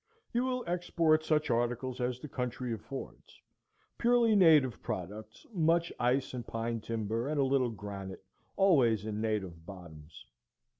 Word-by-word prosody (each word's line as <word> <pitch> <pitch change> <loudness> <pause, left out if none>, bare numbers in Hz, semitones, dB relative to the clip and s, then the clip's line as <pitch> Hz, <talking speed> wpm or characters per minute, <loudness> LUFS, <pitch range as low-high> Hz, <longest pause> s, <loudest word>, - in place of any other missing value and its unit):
You 240 +1 +2
will 255 -1 -1
export 170 -3 +1
such 155 -3 +1
articles 120 +2 -1
as 125 0 -1
the 150 - -8
country 125 -2 -3
affords, 130 +5 -9 0.6
purely 235 -2 +4
native 155 - +5
products, 105 +4 -6
much 170 -1 +2
ice 125 +3 +1
and 125 -2 -4
pine 115 0 -2
timber 115 +2 -2
and 150 0 -1
a - - +4
little 130 -2 +2
granite, 100 -3 -7 0.3
always 125 - +4
in 105 -1 -3
native 95 -7 -2
bottoms. 85 -4 -12
125 Hz, 140 wpm, -31 LUFS, 110-155 Hz, 0.6 s, native